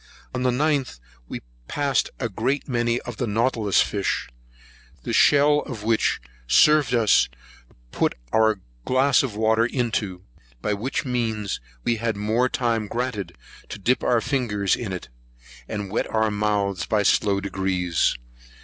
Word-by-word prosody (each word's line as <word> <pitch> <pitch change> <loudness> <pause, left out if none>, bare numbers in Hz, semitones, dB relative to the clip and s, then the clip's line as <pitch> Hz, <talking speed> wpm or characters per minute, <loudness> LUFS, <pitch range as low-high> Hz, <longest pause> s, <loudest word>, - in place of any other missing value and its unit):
On 125 - -2
the 130 - +2
9th, 140 - 0 0.3
we - - -6 0.3
passed 140 -2 0
a 120 - -1
great 125 +7 -2
many 120 -2 0
of 120 -3 -8
the 125 - -1
Nautilus 110 -1 +2
fish, 100 -2 -1 0.7
the - - -3
shell 145 +1 +5
of 120 -8 -6
which 115 0 +1 0.3
served 145 - +5
us 110 - +4 0.3
to - - -28 0.2
put - - 0 0.2
our 110 -3 +3 0.2
glass 130 +2 +3
of 125 -6 -4
water 110 +1 +3
into; 115 -7 -2 0.4
by 105 - -1
which 120 +8 -2
means 115 -5 -2 0.2
we 115 - +1
had 115 -1 -2
more 110 +5 +1
time 115 -4 0
granted 120 -3 -3 0.3
to - - -6
dip 120 +6 +1
our 120 -2 +3
finger 115 -8 -1
in 110 -5 -5
it, 90 -8 -6 0.6
and 100 -2 -5
wet 110 - -1
our 110 -1 +1
mouths 105 -3 0
by 105 -2 +2
slow 100 0 +3
degrees. 95 -5 0
110 Hz, 150 wpm, -24 LUFS, 100-125 Hz, 0.7 s, shell